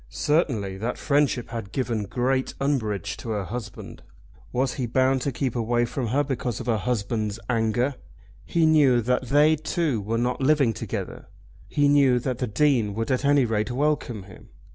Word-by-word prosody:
Certainly 115 - 0
that 115 +4 -3
friendship 140 -4 +1
had 115 -4 -6
given 115 -4 -2
great 130 +4 -1
umbrage 110 - -1
to 115 - -8
her 105 -2 -1
husband. 110 +1 -7 0.5
Was 130 +2 0
he 125 -3 -3
bound 130 +2 +2
to 140 - -1
keep 130 -1 -2
away 120 +1 +1
from 120 +1 -3
her 135 +6 +1
because 125 -4 -3
of 125 - -6
her 115 -3 +1
husband's 110 -1 -2
anger? 115 +3 +1 0.5
He 165 -1 +1
knew 145 -6 +5
that 125 +2 0
they 150 +4 +4
two 155 -5 -1
were 110 +3 -2
not 125 +3 -1
living 135 -4 +3
together. - - -6 0.4
He 145 0 +2
knew 140 -3 +4
that 125 0 -3
the 125 - -1
Dean 115 -3 +1
would 115 +3 -2
at 130 - 0
any 140 -2 +4
rate 110 -2 -1
welcome 130 -5 -1
him. 95 -1 -15
125 Hz, 175 wpm, -25 LUFS, 110-140 Hz, 0.5 s, knew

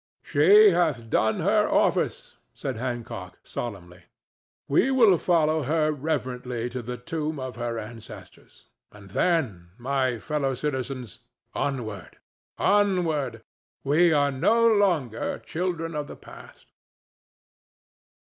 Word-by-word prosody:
"She 420 0 +6
hath 125 -10 0
done 110 0 +1
her 210 +4 +2
office," - - 0 0.2
said 135 -3 -4
Hancock, 115 -7 -5
solemnly. 90 -7 -7 0.6
"We 155 - +3
will 235 -8 +5
follow 160 -3 +2
her 155 +2 +1
reverently 125 -5 -3
to 125 +1 -4
the 125 +1 -6
tomb 155 +4 -4
of 130 -3 -6
her 120 -1 -3
ancestors, 110 0 -11 0.3
and 100 -2 -15
then, 110 - 0
my 130 -1 0
fellow 140 +1 -2
citizens, 130 -4 -4 0.3
onward—onward. 145 - -2 0.4
We 160 +5 +4
are 145 -2 +3
no 230 - +3
longer 175 - +1
children 165 -1 -3
of 150 -1 -3
the - - -9
past." - - -14
140 Hz, 110 wpm, -25 LUFS, 120-165 Hz, 0.6 s, She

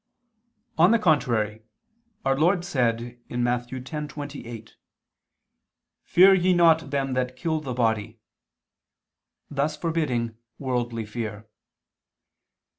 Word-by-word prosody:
On 175 +3 +7
the 230 - +5
contrary, 120 - +1 0.6
Our 135 - +3
Lord 175 +5 +2
said 120 -4 -1
(Matt. 120 0 0
10:28): 130 -3 -7 1.3
"Fear 190 +2 +6
ye 185 0 +3
not 165 -3 +4
them 135 -1 -1
that 125 0 -1
kill 160 +4 -1
the 135 -5 -5
body," 110 -2 0 1.3
thus 145 +2 -1
forbidding 130 -9 -1 0.2
worldly 120 -4 -2
fear. 110 -1 -5
130 Hz, 95 wpm, -25 LUFS, 120-155 Hz, 1.3 s, On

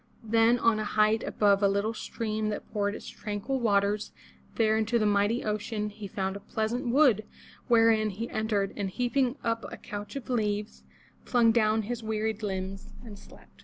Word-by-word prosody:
Then 225 +2 +4
on 230 -2 +2
a - - -1
height 215 +1 +2
above 200 -1 +2
a 200 - +5
little 200 +3 0
stream 215 -1 -3
that 210 - -5
poured 205 -1 0
its - - -9
tranquil 210 +5 -3
waters 205 -2 +1 0.4
there 220 -1 +3
into 220 +2 +1
the 215 - +1
mighty 205 +3 +2
ocean, 210 0 -2
he 205 0 -8
found 190 0 -3
a - - -5
pleasant 220 +5 -2
wood 245 -4 +4 0.4
wherein 225 -3 +4
he 215 +4 -5
entered, 210 -3 -1
and 200 -2 -2
heaping 250 +4 0
up 230 -1 -1
a - - -7
couch 205 +4 -7
of 275 - -6
leaves, 210 -3 -2 0.4
flung 235 -2 +4
down 220 -1 +2
his 235 +2 -4
wearied 220 0 -2
limbs, 190 -1 -4
and 205 -3 -10
slept. - - -18
215 Hz, 175 wpm, -28 LUFS, 205-230 Hz, 0.4 s, a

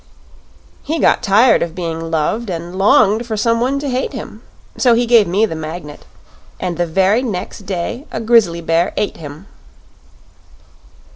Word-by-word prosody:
"He 320 - -3
got - - +3
tired 220 +4 +4
of 170 -1 -3
being 165 -2 -4
loved 165 +8 -1
and 175 0 -5
longed 210 +3 +3
for 220 -2 -3
some 230 +1 +1
one 265 +3 0
to 285 +1 -4
hate 255 0 -2
him. - - -8 0.3
So 245 -3 +3
he 240 +1 +1
gave 230 -4 +4
me 195 +6 +2
the 205 - -5
Magnet 155 -1 -8 0.5
and 180 -2 -3
the 175 +1 -1
very 195 +7 +2
next 200 -4 -5
day 200 - -4
a - - -4
grizzly 220 -7 +3
bear 165 +1 0
ate 210 - -2
him." 150 +3 -10
195 Hz, 160 wpm, -17 LUFS, 170-230 Hz, 0.5 s, tired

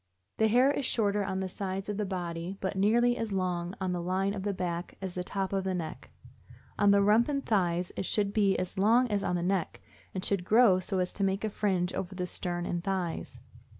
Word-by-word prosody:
The 220 - +4
hair 250 +5 +4
is 285 - -2
shorter 205 -2 +1
on 190 -1 -2
the 190 - -2
sides 190 +1 -4
of 205 -1 -3
the 210 -2 -1
body, 175 0 -4
but 190 +1 -2
nearly 235 +5 +3
as 225 -3 -3
long 180 -2 -1
on 185 -1 -1
the 175 -1 -2
line 190 +3 0
of 200 - -4
the 205 +1 -1
back 175 -2 -4
as 190 -2 -5
on 180 - -2
top 195 0 -3
of 195 -1 0
the 190 -1 -1
neck. 160 -3 -6 0.7
On 205 -1 +5
the 200 0 +5
rump 215 +6 +4
and 280 -1 -1
thighs 180 -4 +1
it 190 - -3
should 205 -1 0
be 200 -3 +3
as 185 +1 -3
long 230 +5 +4
as 205 -2 0
on 180 - 0
the 175 - -1
neck, 185 -1 -1 0.4
and 185 - -2
should 195 -3 +1
grow 215 -1 +5
so 190 +1 -2
as 180 -1 0
to 200 - -3
make 195 +1 0
a 215 - -1
fringe 190 -4 0
over 190 +1 -4
the 180 -1 -2
stern 175 0 -3
and 175 -1 -2
thighs. 185 -4 -3
190 Hz, 235 wpm, -30 LUFS, 180-205 Hz, 0.7 s, On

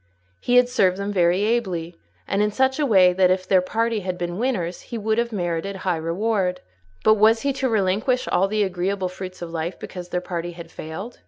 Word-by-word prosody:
He 245 - 0
had 250 0 +6
served 190 -7 +2
them 200 +1 -3
very 180 +1 +3
ably, 185 -7 -1 0.3
and 200 - 0
in 210 - +2
such 265 +5 +1
a 295 - +2
way 185 -5 +5
that 185 0 +4
if 185 0 0
their 185 -1 +4
party 225 +4 -1
had 185 -2 -4
been 175 +1 -4
winners 185 -9 -1
he 235 - -4
would 220 +1 0
have 235 0 -1
merited 175 -1 -2
high 180 -3 +1
reward; 180 +3 -1 0.4
but 215 - +6
was 225 +2 +5
he 280 -1 0
to 265 -1 -1
relinquish 220 +4 +1
all 195 - +2
the 210 +1 +1
agreeable 190 0 -1
fruits 185 -1 -8
of 170 - -7
life 165 +2 -3
because 180 -1 -8
their 180 - -1
party 175 -1 -5
had 170 -1 -10
failed? 180 +10 -8
190 Hz, 215 wpm, -23 LUFS, 180-220 Hz, 0.4 s, had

